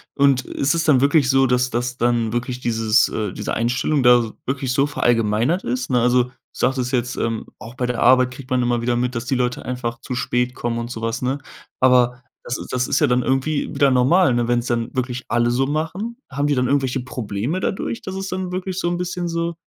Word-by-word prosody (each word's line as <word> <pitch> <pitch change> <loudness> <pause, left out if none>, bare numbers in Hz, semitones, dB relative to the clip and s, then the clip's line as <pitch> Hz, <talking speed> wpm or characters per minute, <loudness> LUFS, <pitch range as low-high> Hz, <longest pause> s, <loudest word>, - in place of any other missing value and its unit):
Und 140 -2 +4
ist 140 +1 -1
es 165 - 0
dann 145 -5 +4
wirklich 140 0 +3
so, 135 0 +4
dass 125 0 +1
das 120 +1 -2
dann 120 -2 0
wirklich 125 +1 -2
dieses, 115 -2 +2
äh 105 -3 -3
diese - - -4
Einstellung 130 +5 0
da 120 -2 +4
wirklich 130 -1 -2
so 135 +2 +3
verallgemeinert 120 - +1
ist, 125 +1 -2
ne? 125 -2 +2
Also, 125 +1 +4
du 125 - -15 0.2
sagtest 125 -1 -1
jetzt, 125 -2 -1
ähm, 115 -1 -2
auch 115 +2 -11
bei 125 -1 -2
der 125 -1 -2
Arbeit 125 +1 +5
kriegt 130 +1 -11
man 130 -1 +1
immer 120 -1 0
wieder 120 0 0
mit, 125 +1 -1
dass 115 - -2
die 135 - 0
Leute 125 -1 -1
einfach 120 -2 -4
zu - - -5
spät 125 0 -1
kommen 120 -1 -2
und 120 +1 -4
so 115 - -6
was, 115 +1 -2
ne? 130 +2 0 0.4
Aber 125 -1 +3 0.2
das 120 - -3
ist - - -8
das 125 0 0
ist - - +2
ja - - +3
dann 125 0 +2
irgendwie 135 +4 -1
wieder 140 - +3
normal, 135 +5 +4
ne, 120 0 0
wenn 120 0 +3
es 120 - -6
dann 115 -1 -2
wirklich 125 -1 -3
alle 120 0 +2
so 130 +2 +1
machen? 175 +10 -3
Haben 140 +2 -1
die 145 - +2
dann 125 -1 +1
irgendwelche 135 -1 +1
Probleme 125 - -3
dadurch, 205 +4 -2
dass 190 - -6
es 195 0 -4
dann 185 -1 -4
wirklich 185 0 -4
so 175 - 0
'n 175 - -1
bisschen 180 0 -3
so, 170 0 -2
125 Hz, 235 wpm, -21 LUFS, 120-140 Hz, 0.4 s, Arbeit